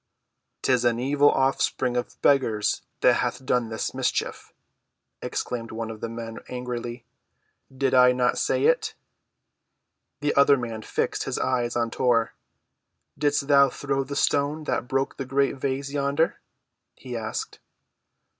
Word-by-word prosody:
"'Tis 125 -2 +2
an 120 -1 +2
evil 140 +3 +3
offspring 130 -1 +1
of 125 - -3
beggars 115 -7 +2 0.2
that - - +5
hath 130 - -2
done 125 -3 +1
this 110 - -3
mischief," - - -2 0.7
exclaimed 115 -2 -4
one 115 0 -4
of 110 - -10
the 115 - -3
men 115 -1 -7
angrily. 120 -1 -5 0.7
"Did 135 0 -1
I 125 -1 +7
not 125 0 +1
say - - +1
it?" - - +2 1.3
The 145 0 +1
other 140 0 +5
man 115 -3 -5
fixed - - -2
his - - -2
eyes 125 -2 0
on 115 -1 0
Tor. 115 -2 +1 0.8
"Didst 145 -1 0
thou 140 -1 +6
throw 135 +1 -2
the 140 +1 -6
stone 145 +2 +1
that 125 -4 -2
broke 135 +1 -1
the 135 - -4
great 140 +1 +1
vase 135 +1 -2
yonder?" 140 +3 0 0.6
he 125 -2 -8
asked. 110 -1 -4
130 Hz, 140 wpm, -25 LUFS, 120-140 Hz, 1.3 s, I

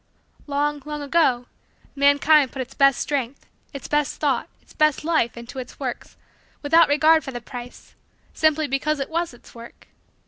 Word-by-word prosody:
Long, 290 0 -1
long, 300 -1 -6
ago 280 -5 +2 0.5
mankind 285 0 +4
put 265 - -4
its 250 - -16
best 275 -2 +4
strength, 275 -2 -3 0.3
its 275 - -8
best 295 -2 -1
thought, 275 -5 0
its - - -22
best 305 -1 +1
life, 310 -8 0
into 235 +2 -8
its 255 - -9
works, 255 -4 -6 0.5
without 325 +3 +5
regard 310 +2 +4
for - - -7
the 245 - -6
price, 245 0 -11 0.4
simply 315 -1 +1
because 285 +2 -1
it 275 +3 -4
was 335 +1 -1
its 240 - -17
work. 235 0 -14
285 Hz, 165 wpm, -22 LUFS, 260-305 Hz, 0.5 s, without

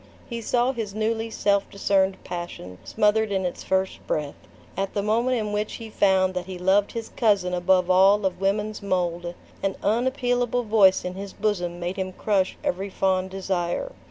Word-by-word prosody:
He 235 -1 -5
saw 245 +3 +1
his 220 -5 -5
newly 225 +1 -1
self 200 -2 +1
discerned 195 -1 +1
passion 175 - -7
smothered 210 0 +1
in 190 -1 0
its 180 - -4
first 190 0 0
breath. 150 -2 -1 0.4
At 195 +1 -3
the 200 - 0
moment 235 +4 +1
in 210 -2 -2
which 210 +1 -2
he 225 -1 -8
found 190 -2 +3
that 180 0 -4
he 185 -1 -6
loved 190 +3 +2
his 230 -1 -5
cousin 200 -6 +1
above 180 0 +3
all 195 +2 +5
of 190 0 -2
women's 210 +2 -1
mold, 175 -3 -1 0.3
an 195 -1 -1
unappealable 245 +1 +1
voice 210 -5 +4
in 180 - -3
his 195 +1 -7
bosom 180 -5 -2
made 175 +2 -3
him 185 -1 -3
crush 195 -2 0
every 195 +3 -2
fond 190 -1 0
desire. 190 - -2
195 Hz, 175 wpm, -25 LUFS, 185-215 Hz, 0.4 s, all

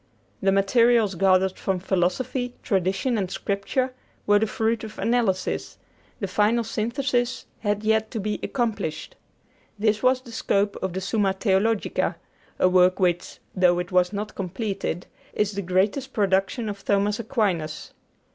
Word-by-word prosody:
The 195 - +3
materials 220 +2 +3
gathered 190 0 +2
from 190 -1 0
Philosophy, 195 +8 -1
Tradition, 195 +4 0
and 190 -2 -2
Scripture 205 +8 -2 0.3
were 205 0 +5
the 220 - +1
fruit 225 +1 -1
of 215 -1 -8
analysis; 225 -6 0 0.4
the 200 - -2
final 210 +5 +2
synthesis 240 +3 -1
had 205 -1 -1
yet 220 0 +2
to 225 - -4
be 210 +1 -2
accomplished. 225 - -2 0.6
This 215 0 +1
was 255 0 +3
the 250 -2 -12
scope 205 -2 0
of 190 -2 -2
the 190 - -3
'Summa 195 0 +1
Theologica,' 200 +2 +1 0.4
a - - +4
work 185 +1 +4
which, 175 -2 0 0.2
though 180 -1 +4
it 175 +1 -3
was 180 0 +3
not 210 +1 -4
completed, 195 -2 -3 0.3
is 210 -1 +1
the 200 -1 -3
greatest 200 +9 0
production 195 +3 +1
of 200 -1 -6
Thomas 205 +1 +1
Aquinas. 195 - -2
205 Hz, 145 wpm, -24 LUFS, 190-225 Hz, 0.6 s, were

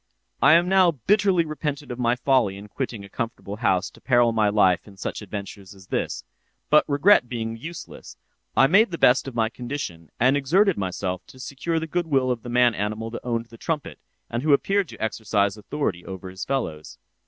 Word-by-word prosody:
"'I 155 +4 +7
now 185 0 +4
bitterly 185 - +2
repented 150 -4 -4
my 120 0 +2
folly 125 -6 +1
in 100 +1 -10
quitting 115 -4 -5
a - - -11
comfortable 105 -2 -5
home 100 -6 +2
to - - -18
peril 120 -2 +3
my 110 -2 +2
life 95 -4 +3
in 100 -1 -15
such 95 - -5
adventures 100 -1 -8
as 95 -2 -17
this; - - -2 0.5
but 150 - +7
regret 145 - +4
being 115 -2 -3
useless, 165 +9 -9 0.4
I 135 - +7
made 195 +10 +5
the 170 - -5
best 130 -1 +4
of 130 - -7
my 115 -1 +2
condition, 120 - -6
and 130 +3 +4
exerted 180 +8 +3
myself 90 -1 -3
to - - -15
secure 140 +6 -3
the 160 - -4
goodwill 155 -7 0
of 120 -2 -3
the 120 - -8
man 120 0 +4
animal 110 +2 -3
that 120 - -6
owned 115 -1 -2
the 115 - -13
trumpet, 155 -4 -4 0.3
and 120 - -3
who 150 +1 +3
appeared 195 +6 +2
to - - -10
exercise 105 -2 0
authority 105 -4 -3
over 95 -1 -8
his 95 0 -6
fellows. 80 - -3
120 Hz, 190 wpm, -24 LUFS, 105-150 Hz, 0.5 s, I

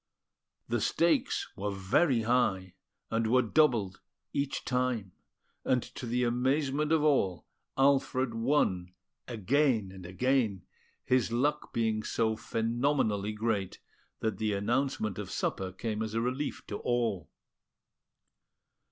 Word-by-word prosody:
The - - 0
stakes - - +1
were 105 +2 -3
very 105 - +2
high, 110 -6 +1 0.4
and 115 0 +1
were 125 +3 +4
doubled 115 -7 +2 0.3
each 140 -1 -2
time; 125 -6 -1 0.5
and 125 -2 +1
to 125 - -6
the 125 +2 0
amazement 135 +5 +1
of 160 -2 +3
all, 100 - +2 0.3
Alfred 135 -2 +2
won 115 -8 0 0.3
again 115 -2 +1
and 95 -1 -10
again, 110 -1 0 0.4
his 125 -2 +2
luck 145 +5 0
being 110 -2 0
so 110 0 0
phenomenally 115 -2 0
great 105 -3 -1 0.4
that 110 -4 -1
the 110 -1 0
announcement 110 -1 -1
of 105 - -5
supper 95 -1 -2
came 110 +3 -3
as 110 0 -3
a - - +2
relief 130 +5 -3
to 105 - -5
all. 115 -8 -1
115 Hz, 120 wpm, -30 LUFS, 105-130 Hz, 0.5 s, were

